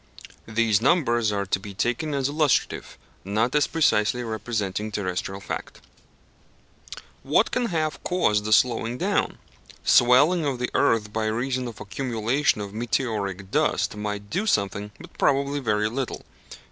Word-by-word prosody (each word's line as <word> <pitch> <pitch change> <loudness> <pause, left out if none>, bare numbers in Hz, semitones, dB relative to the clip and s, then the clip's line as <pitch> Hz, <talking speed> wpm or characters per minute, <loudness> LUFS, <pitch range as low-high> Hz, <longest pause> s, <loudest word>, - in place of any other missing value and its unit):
(These 110 -2 +2
numbers 120 -7 +2
are 100 -1 -1
to 95 - 0
be 100 0 -9
taken 125 +8 -1
as 135 -1 0
illustrative, 145 -1 0 0.3
not 110 +5 0
as 150 -1 +3
precisely 125 -6 +2
representing 110 -2 -3
terrestrial 95 -1 -3
fact.) 100 - -6 1.4
What - - +2
can 245 -1 0
have 155 -4 -2
caused 105 - +1
the 110 - -2
slowing 115 +1 +2
down? - - 0 0.5
Swelling 145 +8 +5
of 140 -3 -1
the 125 0 -3
earth 105 -2 +2
by 110 -1 -1
reason 125 +3 -1
of 115 - -9
accumulation 120 +4 0
of 100 -1 -6
meteoric 105 -5 -2
dust - - +1
might 105 -1 -5
do 200 +6 -1
something, 100 - 0
but - - -13
probably 140 +1 +2
very 105 -4 +1
little. 125 +3 -4
115 Hz, 140 wpm, -25 LUFS, 105-135 Hz, 1.4 s, Swelling